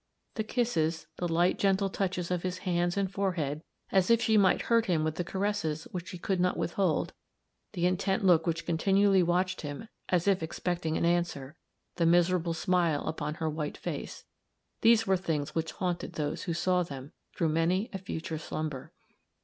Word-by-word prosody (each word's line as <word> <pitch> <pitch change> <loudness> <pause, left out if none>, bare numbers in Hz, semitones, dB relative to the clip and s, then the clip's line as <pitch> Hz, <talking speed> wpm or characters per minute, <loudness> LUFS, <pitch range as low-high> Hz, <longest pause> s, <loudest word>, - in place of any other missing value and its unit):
The 220 - -2
kisses; 170 -9 0
the 175 - -1
light, 175 +2 +2
gentle 195 0 +2
touches 185 -2 -2
of 180 -1 0
his 185 0 -3
hands 175 0 +1
and 195 -2 0
forehead, 180 -7 -1 0.3
as 190 0 +3
if 230 -1 +5
she 220 -1 +2
might 200 -3 +4
hurt 230 -1 +2
him 165 -4 +2
with 155 0 0
the 175 - -2
caresses 190 -5 -2
which 180 -3 -5
she 180 - -7
could 185 +1 -1
not 180 0 +1
withhold; 170 -2 0 0.6
the 175 - 0
intent 190 +2 +1
look 175 -2 +5
which 165 0 -1
continually 195 +3 +3
watched 180 +2 +1
him 145 +9 -6 0.2
as 180 0 +1
if 195 -3 +3
expecting 165 0 -2
an - - +1
answer; 170 -5 0 0.4
the 170 -2 +3
miserable 175 0 +3
smile 170 -4 +1
upon 150 -1 -3
her 160 -1 -2
white 150 -1 -3
face - - -6 0.6
these 225 0 +5
were 190 -1 +3
things 155 -5 -2
which 165 -1 -2
haunted 180 -2 -3
those 150 -1 -3
who 170 - -1
saw 180 +1 +2
them 140 -4 -6 0.2
through 165 -3 +1
many 170 +6 +1
a 195 - -3
future 165 -3 -5
slumber. 155 -4 -5
175 Hz, 180 wpm, -30 LUFS, 160-190 Hz, 0.6 s, if